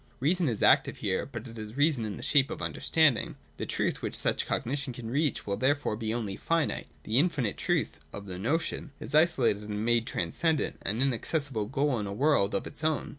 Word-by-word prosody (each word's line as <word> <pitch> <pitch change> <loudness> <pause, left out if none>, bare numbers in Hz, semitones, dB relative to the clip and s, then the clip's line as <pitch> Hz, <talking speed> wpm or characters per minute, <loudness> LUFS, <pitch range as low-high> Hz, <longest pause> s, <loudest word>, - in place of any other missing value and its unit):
Reason 165 +3 +2
is 110 - -2
active - - +4
here, 95 -1 -1
but 120 -2 -7
it 115 -1 -10
is 110 +3 -8
reason 145 -6 +2
in 105 -2 -5
the - - -7
shape 140 -2 +4
of - - -5
understanding. 155 -7 +2 0.2
The - - -4
truth - - -1
which - - -3
such - - +1
Cognition 135 +1 -2
can 115 -1 -7
reach 145 +2 0
will 100 -1 -2
therefore 145 -3 +1
be 110 0 -3
only 110 -4 -2
finite: 165 -2 0 0.2
the 110 +4 +2
infinite 145 - +1
truth - - -1
(of 100 - -8
the 90 -2 -6
notion) 150 - -1
is - - -6
isolated 150 -10 +3
and 105 +1 -4
made 120 -1 +2
transcendent, 150 - 0
an 110 +6 0
inaccessible 135 -2 0
goal 135 0 0
in 105 - -3
a 100 - -4
world 125 -5 +2
of 100 - -1
its - - -6
own. 155 -2 0
125 Hz, 205 wpm, -29 LUFS, 110-145 Hz, 0.2 s, active